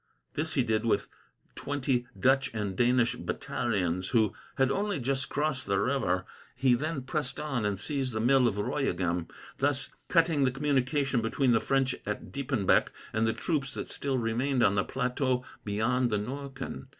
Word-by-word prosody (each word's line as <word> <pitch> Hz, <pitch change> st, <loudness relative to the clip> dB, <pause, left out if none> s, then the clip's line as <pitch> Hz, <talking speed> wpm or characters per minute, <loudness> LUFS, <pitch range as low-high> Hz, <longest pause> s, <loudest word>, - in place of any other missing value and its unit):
This 160 Hz, +2 st, -2 dB
he 130 Hz, -, +3 dB
did, 110 Hz, -2 st, 0 dB
with 115 Hz, -, +1 dB, 0.4 s
twenty 130 Hz, -3 st, -1 dB
Dutch 135 Hz, +1 st, +3 dB
and 105 Hz, -3 st, -2 dB
Danish 120 Hz, +1 st, +3 dB
battalions, 90 Hz, -5 st, -1 dB
who 110 Hz, +1 st, +2 dB, 0.2 s
had 135 Hz, 0 st, +3 dB
only 205 Hz, +3 st, 0 dB
just 130 Hz, 0 st, -1 dB
crossed 145 Hz, -3 st, -1 dB
the 100 Hz, -1 st, +2 dB
river. 100 Hz, -7 st, +1 dB, 0.3 s
He 130 Hz, 0 st, +3 dB
then 145 Hz, +2 st, -1 dB
pressed 150 Hz, +3 st, -2 dB
on 135 Hz, -8 st, -1 dB
and 100 Hz, -2 st, -1 dB
seized 135 Hz, +2 st, -1 dB
the 110 Hz, -, -2 dB
mill 125 Hz, +2 st, +4 dB
of 105 Hz, -3 st, -1 dB
Royegham, 95 Hz, -, -1 dB, 0.3 s
thus 140 Hz, -1 st, 0 dB, 0.2 s
cutting 165 Hz, -4 st, +3 dB
the 130 Hz, -, +4 dB
communication 135 Hz, -1 st, +1 dB
between 120 Hz, +3 st, +1 dB
the 115 Hz, -, +4 dB
French 135 Hz, -1 st, +1 dB
at 105 Hz, 0 st, -5 dB
Diepenbeck 125 Hz, -8 st, +2 dB, 0.3 s
and 110 Hz, 0 st, +2 dB
the 110 Hz, -, +2 dB
troops 140 Hz, +2 st, -2 dB
that -, -, -5 dB
still 135 Hz, -2 st, -1 dB
remained 125 Hz, +3 st, +1 dB
on 95 Hz, -, +4 dB
the 95 Hz, -1 st, +2 dB
plateau 125 Hz, 0 st, -1 dB, 0.2 s
beyond 120 Hz, +5 st, +1 dB
the 105 Hz, -, +1 dB
Norken. 135 Hz, +4 st, -5 dB
125 Hz, 165 wpm, -29 LUFS, 110-140 Hz, 0.4 s, mill